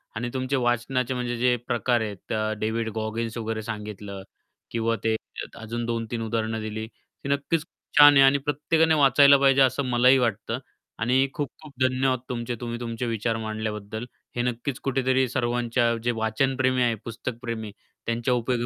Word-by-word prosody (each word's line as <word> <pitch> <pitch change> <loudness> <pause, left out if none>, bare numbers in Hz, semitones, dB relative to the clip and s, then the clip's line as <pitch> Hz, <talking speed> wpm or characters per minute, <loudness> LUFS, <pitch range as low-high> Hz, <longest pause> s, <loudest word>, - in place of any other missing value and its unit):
आणि 120 +2 -2
तुमचे 130 +1 -1
वाचनाचे 125 0 0
म्हणजे 120 -1 -2
जे 125 +1 +3
प्रकार 120 0 +1
आहेत 105 -4 -5 0.3
डेव्हिड 110 +1 -1
गॉगिन्स 115 +1 -3
वगैरे 110 -1 -3
सांगितलं 105 -3 -6 0.5
किंवा 115 0 0
ते 110 0 +2 0.4
अजून 115 +1 -4
2-3 115 0 -3
उदाहरणं 110 0 -1
दिली 110 0 -4
ती 130 +4 -13
नक्कीच 140 +3 +1
खूप - - -12
छान 145 0 +10
आहे 135 - +6
आणि 135 +1 +5
प्रत्येकाने 155 +3 +1
वाचायला 140 0 +6
पाहिजे 135 0 +4
असं 130 +1 +3
मलाही 125 +2 +5
वाटतं 115 0 -1 0.4
आणि 130 +4 +3
खूप-खूप 145 +1 -6
धन्यवाद 130 0 +2
तुमचे 120 0 -3
तुम्ही 120 -1 -4
तुमचे 115 0 -4
विचार 115 0 -1
मांडल्याबद्दल. 110 0 -4 0.3
हे 120 - 0
नक्कीच 125 +2 -2
कुठेतरी 130 -1 +2
सर्वांच्या 120 -1 +1
जे 120 - +2
वाचन 115 +4 0
प्रेमी 130 -1 +2
आहे 120 -2 +2
पुस्तकप्रेमी 115 -2 -5 0.3
त्यांच्या 115 +2 0
उपयोगी 120 0 0
120 Hz, 155 wpm, -25 LUFS, 115-130 Hz, 0.5 s, छान